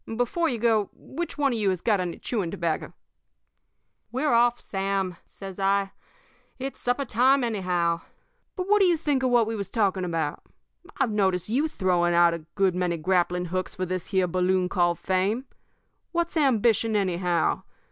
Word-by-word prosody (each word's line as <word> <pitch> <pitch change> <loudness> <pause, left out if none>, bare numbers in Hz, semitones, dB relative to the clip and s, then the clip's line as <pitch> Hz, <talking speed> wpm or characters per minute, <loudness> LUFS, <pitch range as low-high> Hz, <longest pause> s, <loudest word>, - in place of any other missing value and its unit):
Before 320 +8 +1
you 245 - -2
go, 220 -3 +2
which 335 +4 -6
one 280 -3 +2
of 230 - -2
you 205 -2 +2
has 185 -2 -1
got 210 +1 +1
any 180 -2 -3
chewing 205 -8 -2
tobacco?' 165 -1 -3 1.2
"'We're 265 +3 0
off, 240 +1 +4
Sam,' 195 -2 -2
says 195 -1 -10
I. 195 0 +1 0.7
'It's 270 +1 -5
supper 245 +3 0
time, 255 +3 +3
anyhow. 180 -7 0 0.5
But 365 0 -3
what 420 +1 +4
do 390 - +5
you 345 -2 +3
think 295 -4 0
of 260 - +1
what 240 -2 +4
we 225 +1 -3
was 200 -3 -4
talking 195 -4 +1
about? 165 -4 -2 0.6
I've 265 -5 +1
noticed 190 -3 0
you 275 +8 +1
throwing 175 - +1
out 170 0 +5
a 165 -2 -7
good 195 -2 +2
many 180 -1 -1
grappling 180 +1 +1
hooks 185 0 -2
for 185 - -2
this 185 -1 -4
here 190 -2 +2
balloon 180 +1 +1
called 175 -2 +1
fame 195 - 0 0.7
What's 340 0 -1
ambition, 230 -6 +2
anyhow? 180 -3 +1
195 Hz, 170 wpm, -26 LUFS, 180-245 Hz, 1.2 s, do